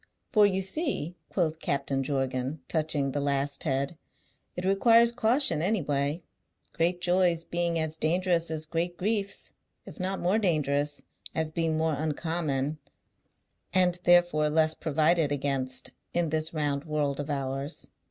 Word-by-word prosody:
"For 210 -2 +6
you 190 -1 0
see," 195 - -1
quoth 160 -4 -1
Captain 135 -2 -1
Jorgan, 135 +1 -2
touching 155 -4 0
the 145 - -2
last 140 +1 0
head, 140 +3 -1 0.6
"it 180 - -4
requires 230 +4 +5
caution 235 - +3
any 190 +1 +1
way, 145 +3 -1 0.5
great 175 +2 0
joys 175 -2 +2
being 170 0 -1
as 160 0 -1
dangerous 170 +1 +1
as 160 -1 -3
great 170 +2 -2
griefs, 200 0 -2 0.3
if - - -12
not 190 +1 -2
more 190 +5 +2
dangerous, 150 -6 0 0.3
as 160 -1 0
being 160 -1 0
more 160 0 +1
uncommon 155 -1 -2 1.0
(and 180 -1 +3
therefore 175 -4 +4
less 155 +1 +3
provided 160 0 +1
against) 135 -2 -1 0.2
in 170 -2 +1
this 155 +1 -1
round 145 -2 -1
world 150 -3 -1
of 145 +1 -4
ours. 135 +1 -3
160 Hz, 140 wpm, -28 LUFS, 145-175 Hz, 1.0 s, For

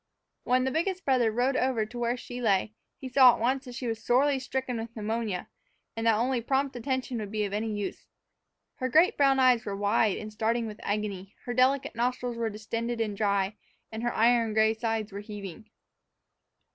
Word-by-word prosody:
When 255 +1 +3
the 265 - 0
biggest 370 +5 -1
brother 250 -5 +3
rode 250 +4 +1
over 250 -5 +1
to 240 +3 -8
where 240 +1 0
she 245 0 -7
lay, 210 -1 +1 0.2
he 265 - -7
saw 255 -1 +7
at - - -9
once 260 +4 0
that 250 -1 -9
she 260 - -5
was 225 -1 -3
sorely 270 +3 +3
stricken 260 -1 -3
with 230 +1 -7
pneumonia, 220 -3 -3 0.5
and 225 0 -1
that 225 - +5
only 245 +1 0
prompt 270 +3 0
attention 260 0 -2
would 210 -2 -5
be 210 0 -1
of 200 - -5
any 215 +2 -1
use. 205 -1 -5 0.7
Her 255 - -2
great 320 +8 +5
brown 275 -1 +4
eyes 250 -2 +4
were 200 -3 -4
wide 205 0 +2
and 215 0 -7
starting 225 +2 0
with 215 -1 -7
agony, 200 -1 -3
her 245 - -3
delicate 260 +2 +2
nostrils 245 +1 -1
were 230 -1 -1
distended 230 +3 -4
and 215 -3 -1
dry, 200 0 0 0.3
and 220 0 -5
her 240 0 0
iron 230 -1 +3
gray 220 0 +4
sides 225 -2 -2
were 200 - -6
heaving. 205 0 -9
230 Hz, 195 wpm, -28 LUFS, 215-255 Hz, 0.7 s, saw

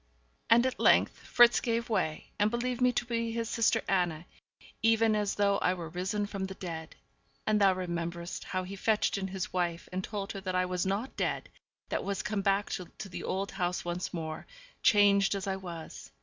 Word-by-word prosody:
And 235 +2 +6
at 260 - -1
length - - +5
Fritz 240 -1 +5
gave 230 -1 -1
way, 160 -8 -1
and 210 +1 +4
believed 245 +2 -2
me 250 0 +5
to 245 0 -1
be 230 -1 -1
his 230 0 -2
sister 225 0 +2
Anna, 175 -4 0 0.6
even 225 -1 +4
as 205 -1 0
though 200 -1 +2
I 180 - +2
were 170 -3 -6
risen 190 +5 -2
from 200 -2 -4
the 190 0 -7
dead. 165 -4 -6 0.5
And 215 -1 +2
thou 195 -1 +6
rememberest 170 -1 -4
how 185 -1 -2
he 190 +2 -7
fetched 210 0 +1
in 190 - -2
his 190 -1 -4
wife, 175 -1 -1
and 185 +1 -3
told 200 -1 -4
her 195 - -6
that 185 -1 -3
I 185 0 +2
was 180 0 -1
not 205 +7 -2
dead, - - -2 0.4
but - - -2
was 200 -1 -2
come 210 -2 -1
back 195 +1 +1 0.3
to 195 - -7
the 180 - -6
old 195 +1 -2
home 180 -2 -1
once 175 +1 -3
more, 160 -2 -5 0.3
changed 200 -1 +5
as 195 - -3
I 190 -1 -1
was. 175 -4 -8
195 Hz, 200 wpm, -30 LUFS, 180-215 Hz, 0.6 s, And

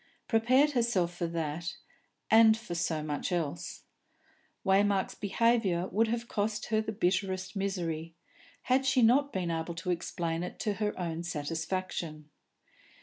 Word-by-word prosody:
Prepared 255 +6 +4
herself, 230 -9 +1
for 175 -1 -2
that, 165 +1 -3 0.6
and 220 0 +7
for 225 -6 -7
so 165 -2 -1
much 150 +4 -3
else. 165 -5 -3 0.8
Waymark's 195 0 +3
behaviour 200 -4 +1
would 225 +4 +2
have 235 +1 -2
cost 210 0 -1
her 215 0 +2
the 220 - -4
bitterest 190 -1 -1
misery, 165 -5 -3 0.5
had 260 +1 +2
she 255 -2 +4
not 280 +5 +4
been 180 -3 -2
able 165 +1 -3
to 170 +2 -2
explain 170 -1 -2
it 180 - -5
to 210 -2 0
her 210 -2 -1
own 170 -2 -2
satisfaction. 160 -1 -4
185 Hz, 140 wpm, -30 LUFS, 170-220 Hz, 0.8 s, and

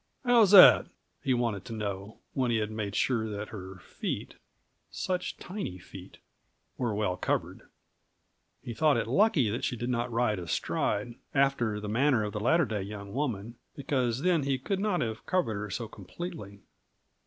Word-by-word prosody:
"How's 235 -5 +6
that?" 195 -2 +9 0.3
he 135 -2 +1
wanted 115 -5 -1
to 120 - -7
know, 100 -1 -5 0.2
when 130 -2 0
he 115 - +2
had 105 0 -2
made 105 -2 -4
sure 115 -4 +1
that 105 0 -5
her 95 -3 -8
feet - - -5 0.6
such 180 -1 -3
tiny 185 - -6
feet 95 +1 -12 0.6
were 120 -4 -1
well 105 -4 0
covered. - - -3 0.9
He 120 - -5
thought 145 +3 +3
it 115 - 0
lucky 140 - +3
that 115 - -3
she - - -1
did 120 +2 -3
not 120 0 -1
ride 115 -4 +1
astride, 105 +6 -2 0.2
after 135 -6 +2
the 105 - -6
manner 120 +2 +2
of 105 -1 -4
the 105 - -3
latter 160 +9 +3
day 110 -3 -3
young 100 0 -7
woman, 120 -4 -3 0.2
because 130 -2 -1
then 175 -3 +3
he 135 -1 0
could 190 +9 -2
not 200 -3 0
have 110 -2 -4
covered 180 -11 +1
her 105 0 -4
so 115 +4 -4
completely. 100 - -8
115 Hz, 170 wpm, -29 LUFS, 105-140 Hz, 0.9 s, that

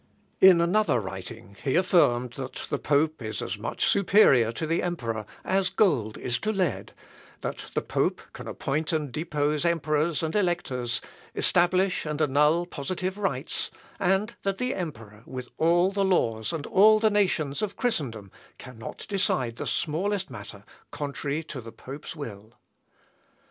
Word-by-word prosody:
In 185 -3 +8
another 170 - +3
writing 100 +1 -8
he 135 - +1
affirmed, 125 -10 +3
that 130 0 -6
the 145 - 0
pope 150 0 +1
is 110 -3 -4
as 100 +2 -4
much 110 - -1
superior 180 - +5
to 140 +7 -4
the 165 +2 +1
emperor 115 - -3 0.2
as 190 0 +2
gold 130 - +2
is 125 -1 -1
to 215 - -1
lead; 185 -7 -1 0.5
that - - -4
the - - 0
pope - - 0
can - - -9
appoint 150 +3 -2
and 150 -4 -1
depose 150 -1 -1
emperors 160 -1 +1
and 160 +3 -2
electors, 170 - 0 0.3
establish 180 +2 +2
and 150 -1 -3
annul 150 +3 +3
positive 185 +5 -4
rights; 195 - -2 0.3
and 195 +5 +1
that 195 -1 -1
the 250 +3 -1
emperor, 115 - -6
with 125 -1 -7
all 175 +3 +3
the 200 0 0
laws 115 - +1
and 155 -3 -4
all 215 +3 +6
the 215 0 +3
nations 175 -8 +1
of 205 -2 -2
Christendom, 125 - -2 0.3
cannot 125 -2 -9
decide 130 - 0
the - - -4
smallest 185 +2 -1
matter 105 -3 -9 0.2
contrary 145 +1 -3
to 140 -4 -7
the 115 0 -10
pope's 140 +7 -9
will. 115 -6 -8
155 Hz, 150 wpm, -27 LUFS, 125-185 Hz, 0.5 s, In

